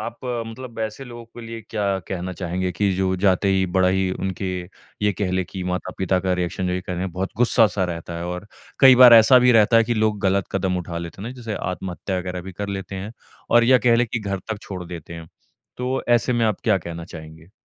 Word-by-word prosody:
आप 115 +2 -6
मतलब 115 0 -5
ऐसे 110 +5 -4
लोगों 120 -2 -10
के 120 +1 -13
लिए 115 0 -7
क्या 100 -3 0
कहना 90 0 -4
चाहेंगे 90 +1 -3
कि 100 +3 0
जो 95 0 +1
जाते 95 +1 +3
ही 95 -1 +2
बड़ा 95 -1 +4
ही 95 0 +1
उनके, 95 +1 -4 0.6
ये 105 -1 +3
कह 95 -1 -2
लें 95 0 0
कि 95 -2 -5
माता-पिता 90 +1 -1
का 95 0 0
रिएक्शन 90 +1 -2
जो 90 - -1
ये 90 - -1
कह 90 -1 -5
लें, 95 +1 -3
बहुत 95 +2 -3
गुस्सा-सा 110 -5 +3
रहता 85 -1 -5
है 85 - -5
और 90 +3 -5 0.3
कई 130 -1 +9
बार 120 -2 +10
ऐसा 115 +3 +8
भी 125 0 +5
रहता 115 +1 +5
है 115 - +5
कि 120 - -1
लोग 110 -1 +1
गलत 95 0 +1
कदम 95 -1 0
उठा 85 -1 -5
लेते 85 +3 -8
हैं 115 - -5
ना, - - -7
जैसे 115 -4 -6
आत्महत्या 90 +1 -4
वगैरह 90 0 -4
भी 95 0 -9
कर 100 +2 -5
लेते 95 -1 -5
हैं 100 +4 -6 0.4
और 120 0 +5
या 130 +1 +5
कह 115 +1 +3
लें 120 0 +2
कि 120 - 0
घर 100 -1 -3
तक 110 -2 -3
छोड़ 90 -2 -7
देते 85 -1 -9
हैं। 80 -1 -10 0.5
तो 130 +1 -2
ऐसे 120 +1 +3
में 120 -1 +1
आप 105 - -1
क्या 105 -4 +3
कहना 85 -1 -7
चाहेंगे? 80 0 -12
95 Hz, 240 wpm, -22 LUFS, 90-115 Hz, 0.6 s, बार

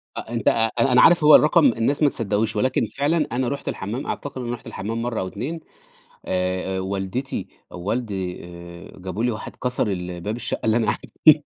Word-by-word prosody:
أ - - -3
أنت 115 -3 -3
أ - - +8 0.3
أنا 135 - +3
أنا 125 - +6
عارف 170 -3 +6
هو 150 0 +9
الرقم 155 +1 +5
الناس 125 +6 +2
ما 145 - +6
تصدقهوش 110 -1 -1
ولكن 130 +5 +1
فعلًا 150 +3 0
أنا 125 +1 0
رُحت 140 +2 -4
الحمّام 110 +7 -3
أعتقد 135 -2 -4
أنا 120 0 -3
رُحت 120 - -9
الحمّام 115 +4 -4
مرّه 120 -1 -2
أو 95 - -2
2 135 - -5 0.7
آآ 95 +1 -1
آآ، - - -1
والدتي 95 +7 -3 0.2
أ - - -13
ووالدي 95 -2 -3
آآ، 85 +1 -11
جابوا 95 +5 -3
لي 125 - +2
واحد 110 - -7
كَسَر 125 -1 -1
ال 90 -3 -4
باب 105 +5 -3
الشقة 120 - -3
اللي 110 +1 +3
أنا 115 - +2
قاعد 105 - +1
فيها. 155 - +5
115 Hz, 210 wpm, -23 LUFS, 95-130 Hz, 0.7 s, هو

